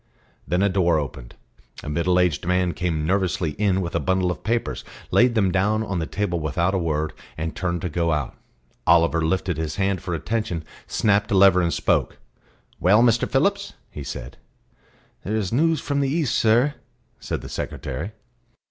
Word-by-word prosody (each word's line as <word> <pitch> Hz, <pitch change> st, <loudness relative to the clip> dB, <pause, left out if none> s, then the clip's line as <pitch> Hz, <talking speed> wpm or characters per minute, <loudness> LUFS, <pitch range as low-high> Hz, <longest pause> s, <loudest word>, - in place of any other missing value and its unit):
Then 90 Hz, +6 st, +1 dB
a -, -, +4 dB
door 90 Hz, -4 st, +2 dB
opened; 65 Hz, -4 st, -5 dB, 0.5 s
a -, -, -8 dB
middle 85 Hz, +4 st, +1 dB
aged 85 Hz, -2 st, +1 dB
man 90 Hz, -1 st, +1 dB
came 80 Hz, -4 st, -2 dB
nervously 90 Hz, -2 st, 0 dB
in 95 Hz, -2 st, +2 dB
with 85 Hz, -2 st, -4 dB
a -, -, +1 dB
bundle 95 Hz, -1 st, +1 dB
of 90 Hz, -, -7 dB
papers, 115 Hz, +4 st, -1 dB, 0.3 s
laid 120 Hz, 0 st, +4 dB
them 100 Hz, -4 st, +2 dB
down 105 Hz, +4 st, +1 dB
on 100 Hz, -4 st, -2 dB
the 80 Hz, -, -3 dB
table 95 Hz, -5 st, -2 dB
without 85 Hz, +4 st, 0 dB
a 95 Hz, -, +1 dB
word, 80 Hz, -2 st, -1 dB, 0.2 s
and 80 Hz, 0 st, -4 dB
turned 85 Hz, -1 st, -2 dB
to -, -, 0 dB
go 85 Hz, +1 st, 0 dB
out. 75 Hz, -3 st, -1 dB, 0.5 s
Oliver 85 Hz, -1 st, +4 dB
lifted 90 Hz, 0 st, 0 dB
his 80 Hz, -1 st, -3 dB
hand 95 Hz, -2 st, 0 dB
for 85 Hz, -, -3 dB
attention, 105 Hz, -1 st, -2 dB, 0.2 s
snapped 105 Hz, -2 st, +1 dB
a -, -, +1 dB
lever, 95 Hz, -1 st, +6 dB
and 85 Hz, -1 st, +1 dB
spoke. -, -, 0 dB, 0.6 s
"Well, 105 Hz, +6 st, +5 dB
Mr. 120 Hz, -1 st, +3 dB
Phillips?" 200 Hz, +9 st, +1 dB, 0.2 s
he 75 Hz, -, -7 dB
said. 65 Hz, -2 st, -7 dB, 0.9 s
"There 105 Hz, -, -2 dB
is 105 Hz, -3 st, -1 dB
news 160 Hz, +4 st, +3 dB
from 140 Hz, -1 st, -1 dB
the 140 Hz, -1 st, +1 dB
East, 145 Hz, -4 st, 0 dB
sir," 120 Hz, +6 st, +3 dB, 0.5 s
said -, -, -4 dB
the -, -, -8 dB
secretary. 75 Hz, +11 st, -5 dB
90 Hz, 180 wpm, -23 LUFS, 85-105 Hz, 0.9 s, lever